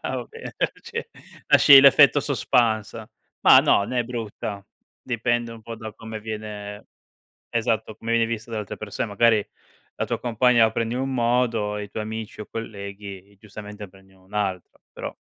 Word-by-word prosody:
ah, - - -3
va - - -4
bene. 460 +1 -9 0.3
Ce 465 0 -6 0.4
lasci 140 -2 +9
l'effetto 140 +1 +6
suspense. 115 -5 0 0.3
Ma - - +8
no, - - +4
né 120 +3 -1
brutta, 110 -4 -6 0.4
dipende 120 -1 -1
un 115 -1 -12
po' 115 +1 -7
da 110 -1 -8
come 110 0 -8
viene 105 -1 -7 0.6
esatto, 110 -2 -1
come 115 +1 -6
viene 115 0 +3
visto 115 0 -5
da 110 - -3
altre 105 - -6
persone, 110 +1 -4
magari 105 +1 +3 0.5
la - - -1
tua - - -2
compagna 120 0 +3
la 110 - +2
prende 115 +1 -2
in 125 - -2
un 135 0 -2
modo, 115 -3 +1
e 105 - -4
i - - -11
tuoi 110 - -4
amici 110 0 -7
o 105 - -7
colleghi 100 -3 -8
giustamente 105 0 -10
prendi 95 +1 -21
in 95 - -23
un 95 +2 -19
altro, 95 -4 -3
però - - -7
110 Hz, 175 wpm, -24 LUFS, 105-120 Hz, 0.6 s, lasci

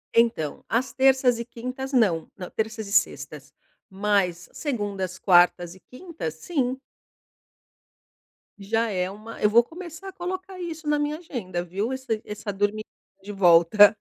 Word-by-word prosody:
Então, 230 -11 +2
às 245 +3 0
terças 260 -2 +4
e 235 - -4
quintas 255 +3 -6
não. 200 - +2
Não, 180 -1 -7
terças 220 -1 -3
e - - -8
sextas, 210 0 0 0.4
mas 190 -3 0
segundas, 200 - -3
quartas 175 -2 +4
e 190 - -16
quintas, 255 - -7
sim. 260 - -1 1.8
Já 225 +3 0
é 185 -1 -1
uma 215 +3 -10
eu 210 - +5
vou 235 +2 +6
começar 345 +6 -9
a - - -11
colocar 370 +1 -5
isso 325 -3 -6
na 295 0 +2
minha 295 +1 -1
agenda, 195 - -4
viu? 195 +7 -3
Essa 260 -5 -3
essa 210 0 -5
dormi 205 +2 0 0.4
de 205 - -7
volta. 195 +3 +6
220 Hz, 145 wpm, -25 LUFS, 195-265 Hz, 1.8 s, vou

